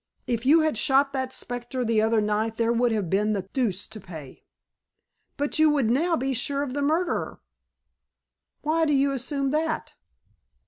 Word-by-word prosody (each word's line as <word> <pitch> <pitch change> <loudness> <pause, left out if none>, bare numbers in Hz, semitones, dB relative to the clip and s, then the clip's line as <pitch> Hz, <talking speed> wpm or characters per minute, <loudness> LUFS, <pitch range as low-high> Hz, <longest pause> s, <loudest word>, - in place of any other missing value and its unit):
"If 240 +1 -2
you 320 +3 +6
had 310 -8 0
shot 275 +1 +3
that 260 -1 -2
specter 245 0 -4
the 225 -1 +2
other 220 0 +2
night 215 +2 -1
there 230 0 +2
would 240 0 +2
have 210 -5 -1
been 210 +4 +1
the 195 -3 -2
deuce 210 -8 -1
to 215 - -10
pay." 160 -9 -11 0.9
"But 290 +2 -2
you 315 0 +6
would 275 -7 +2
now 330 +7 +2
be 265 +1 -1
sure 280 +3 -1
of 265 -3 -5
the 285 - -2
murderer?" 320 +5 -1 1.2
"Why 320 +2 +2
do 295 - +1
you 275 0 +3
assume 275 +1 -2
that?" 315 +1 -1
260 Hz, 175 wpm, -25 LUFS, 225-285 Hz, 1.2 s, you